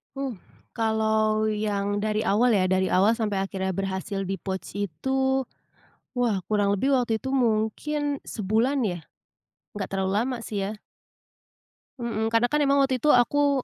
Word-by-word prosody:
Uh, 275 -1 -3 0.4
kalau 220 -1 +1
yang 205 -1 -1
dari 215 +1 0
awal 225 +3 +3
ya, 185 -2 +2
dari 190 0 +2
awal 195 +4 +4
sampai 220 -3 -1
akhirnya 190 -1 -3
berhasil 195 +1 -3
di-pouch 190 -1 -4
itu, 265 - 0 0.8
wah 225 -6 +1
kurang 205 -1 +2
lebih 260 +8 0
waktu 240 -2 0
itu 265 - -3
mungkin 270 +4 0
sebulan 225 +6 0
ya. 180 -6 -1 0.8
Nggak 205 -1 -3
terlalu 190 -1 -1
lama 245 +4 0
sih 210 -3 -3
ya. 210 +2 -5 1.2
Mhm, 225 -2 -1
karena 230 +1 +4
kan 300 - +2
emang 280 0 +3
waktu 265 -2 0
itu 300 - -1
aku 280 +1 +4
215 Hz, 145 wpm, -25 LUFS, 200-250 Hz, 1.2 s, awal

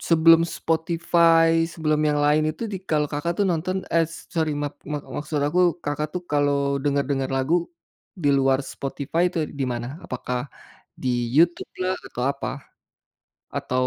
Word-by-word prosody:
sebelum 165 0 +5 0.2
Spotify, 165 0 +3 0.2
sebelum 155 -2 0
yang 150 - +1
lain 155 +1 +3
itu 155 +8 -8
di 190 - -3
kalau 150 -1 +2
Kakak 160 +4 -1
tuh 205 - +3
nonton, 175 +3 -1 0.2
eh 165 -1 +4 0.3
sorry, 160 -2 +1
maaf 145 - -3 0.2
ma 150 - -1 0.2
maksud 150 0 -2
aku 175 +5 +2 0.2
Kakak 145 +1 -2
tuh 180 - -3
kalau 140 -1 +2
dengar-dengar 140 -1 0
lagu 135 +6 +1 0.7
di 145 - +3
luar 135 0 +3
Spotify 140 +4 -2
itu 170 - -4 0.2
di - - +2
mana, 120 0 -4 0.2
apakah 125 0 -3 0.6
di 130 - 0 0.3
YouTube 170 +2 +3
lah 185 +1 +1
atau 125 - -5
apa. 140 - -4 1.1
Atau 125 0 0
150 Hz, 150 wpm, -24 LUFS, 140-165 Hz, 1.1 s, sebelum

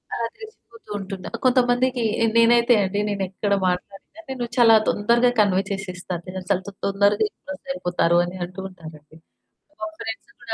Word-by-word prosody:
ఆ! - - -4 0.2
తెలిసిపోతూంటుంది. 205 - -8 0.2
కొంతమందికి 250 0 +2 0.3
నేనైతే 235 +1 +5
అండి, 195 +2 -1
నేనెక్కడ 200 0 -2
మాట్లాడినా 195 - -5
నేను 255 -2 -3
చాలా 230 -2 +7
తొందరగా 235 +4 +3
కన్వే 195 -3 +4
చేసేస్తాను. 185 -3 -5
నేనసలు 185 +1 -2 0.2
తొందరగా 200 +1 +2
ఇంప్రెస్ 290 - -10
అయిపోతారని 175 -5 +1
అంటూ 180 +2 -11
ఉంటారండి. 160 -4 -13 0.6
మా 215 - -2
ఫ్రెండ్స్ 225 -1 -6
కూడా 225 - -5
200 Hz, 120 wpm, -23 LUFS, 185-240 Hz, 0.6 s, చాలా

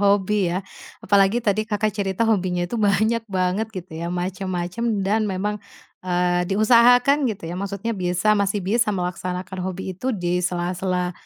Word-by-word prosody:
hobi 200 -1 +2
ya, 185 +2 -2 0.4
apalagi 200 +1 +4
tadi 215 +1 0
Kakak 210 -1 0
cerita 195 +1 -1
hobinya 185 -5 +1
itu 230 +5 -3
banyak 215 +3 +2
banget 185 +3 0
gitu 185 -1 -7
ya, 170 - -3
macem-macem 185 +4 -2
dan 210 +2 +1
memang, 205 +2 -2 0.4
eee, 180 -1 0
diusahakan 245 +6 +5
gitu 200 -6 -5
ya. 175 +3 -5
Maksudnya 200 +3 -3
bisa 180 +1 +1
masih 200 -1 0
bisa 225 +4 +1
melaksanakan 180 -1 -3
hobi 185 +1 -4
itu 190 +8 -8
di 180 -1 0
sela-sela, 180 0 -1
195 Hz, 150 wpm, -22 LUFS, 180-210 Hz, 0.4 s, diusahakan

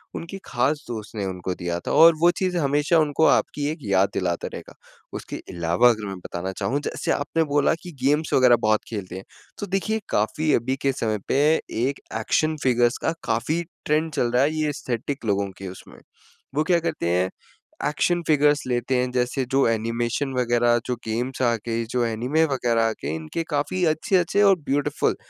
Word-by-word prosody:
उनकी 175 +4 -6
खास 140 +5 0
दोस्त 110 -2 -7
ने 100 -2 -2
उनको 90 -1 -3
दिया 85 0 -3
था - - -5
और 165 +1 +7
वो 175 - +6
चीज़ें 180 -2 0
हमेशा 145 +4 +2
उनको 155 +1 +2
आपकी 145 -2 +2
एक 160 - -5
याद 100 -1 +2
दिलाता 90 -2 -1
रहेगा। - - -9 0.4
उसके - - -6 0.2
अलावा 85 +8 +3
अगर 110 -3 -1
मैं 95 - -5
बताना 90 +1 -5
चाहूँ, 135 +8 -2
जैसे - - -3
आपने 160 +3 0
बोला 145 0 +2
कि 180 - -9
गेम्स 150 +3 +1
वग़ैरह 125 -2 +6
बहुत 110 0 +2
खेलते 100 -5 -6
हैं, 95 - -7 0.4
तो 205 - -3
देखिए 205 +4 -1
काफ़ी 150 +9 +1
अभी 125 +3 0
के 135 - +2
समय 110 -4 -1
पे - - +1 0.5
एक 140 - -3 0.2
एक्शन 155 +7 +1
फ़िगर्स 120 -2 +3
का 160 - +2
काफ़ी 150 +9 0 0.2
ट्रेंड 155 +1 +1
चल 120 -3 0
रहा 125 +2 +3
है, 145 - +2
ये 155 -1 0
एस्थेटिक 130 0 -4
लोगों 100 -2 0
के 95 - -7
उसमें। 95 - -11 0.6
वो 150 - +2
क्या 170 +1 +3
करते 160 - -2
हैं? 90 +1 +1 0.6
एक्शन 175 +3 +1
फ़िगर्स 150 -1 +4
लेते 125 +1 0
हैं, 125 0 0
जैसे 125 +1 0
जो 135 -2 +3
एनिमेशन 115 +4 -1
वग़ैरह, 120 -1 +2
जो 125 - -1
गेम्स 120 +4 -3
आ 120 -2 +3
गईं, 115 0 -1
जो 125 -1 +1
एनीमे 125 +8 +1
वग़ैरह 120 -5 +1
आ - - 0
गए, 75 +3 -2
इनके 80 - -4
काफ़ी 150 +5 -1
अच्छे-अच्छे 170 +4 +2
और 195 -1 +6
ब्यूटीफुल 145 0 0
125 Hz, 185 wpm, -24 LUFS, 110-150 Hz, 0.6 s, और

